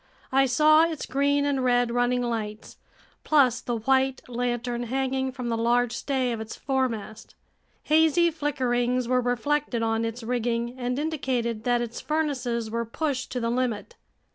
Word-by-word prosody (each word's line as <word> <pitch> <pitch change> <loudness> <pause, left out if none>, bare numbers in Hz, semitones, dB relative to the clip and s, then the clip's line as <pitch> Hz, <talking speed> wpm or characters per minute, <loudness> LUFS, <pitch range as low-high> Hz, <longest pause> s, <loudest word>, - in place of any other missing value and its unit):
I 270 +1 +4
saw 305 +5 +5
its 325 -3 -4
green 285 +2 +1
and 275 -2 0
red 245 -1 +2
running 245 +1 +1
lights, 220 -3 -4 0.5
plus 255 -5 +3
the 240 - -2
white 265 +3 +1
lantern 240 0 -2
hanging 265 +1 -1
from 250 -2 -5
the 230 - 0
large 240 +1 +2
stay 260 -2 -1
of 230 -2 -3
its 220 0 -7
foremast. 230 -5 -3 0.5
Hazy 320 +2 +4
flickerings 255 -5 0
were 250 0 +2
reflected 245 0 0
on 225 0 0
its 230 +1 -4
rigging 235 0 -1
and 250 0 -2
indicated 255 -7 -2
that 245 -1 +2
its 240 0 -5
furnaces 250 -8 -1
were 230 +1 -1
pushed 260 +2 -3
to 250 - -1
the 230 -1 -1
limit. 250 - -2
245 Hz, 155 wpm, -26 LUFS, 235-270 Hz, 0.5 s, saw